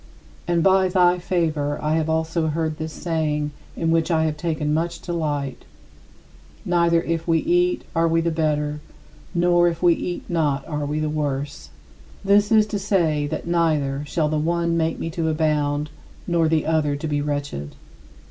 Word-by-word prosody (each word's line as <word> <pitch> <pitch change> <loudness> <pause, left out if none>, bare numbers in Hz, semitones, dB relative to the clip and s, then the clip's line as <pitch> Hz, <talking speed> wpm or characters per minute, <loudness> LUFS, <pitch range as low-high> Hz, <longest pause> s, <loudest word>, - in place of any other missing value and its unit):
" - - -26
And 170 -1 +2
by 190 -1 +4
thy 180 -1 +3
favor 155 -5 -1
I 150 +1 0
have 160 0 0
also 160 0 0
heard 155 0 -1
this 160 0 -4
saying 150 -3 -2 0.2
in 165 -1 0
which 165 0 +2
I 160 -2 +2
have 155 -1 -1
taken 150 -1 -1
much 165 +2 -1
delight: 145 -6 -3 1.0
"Neither 170 -1 +2
if 165 0 -2
we 165 -1 +3
eat 355 - +1
are 165 0 +3
we 165 0 +2
the 165 0 0
better; 150 -2 -1 0.6
nor 175 0 +4
if 170 0 -2
we 175 -1 +6
eat 175 +1 -5
not 150 -5 0
are 150 -2 -3
we 150 +1 -2
the 155 - 0
worse." 145 - -3 0.6
This 205 +1 +4
is 215 -1 +6
to 205 - 0
say 165 -7 +1
that 155 +1 -4
neither 155 -5 +1
shall 155 +1 0
the 155 0 0
one 170 +1 0
make 165 -1 0
me 165 - -4
to 160 0 -1
abound, 150 -1 0 0.3
nor 170 -2 +2
the 160 -1 +1
other 155 -2 +1
to 145 +3 -4
be 145 -1 0
wretched. 145 - -4
160 Hz, 175 wpm, -22 LUFS, 150-170 Hz, 1.0 s, we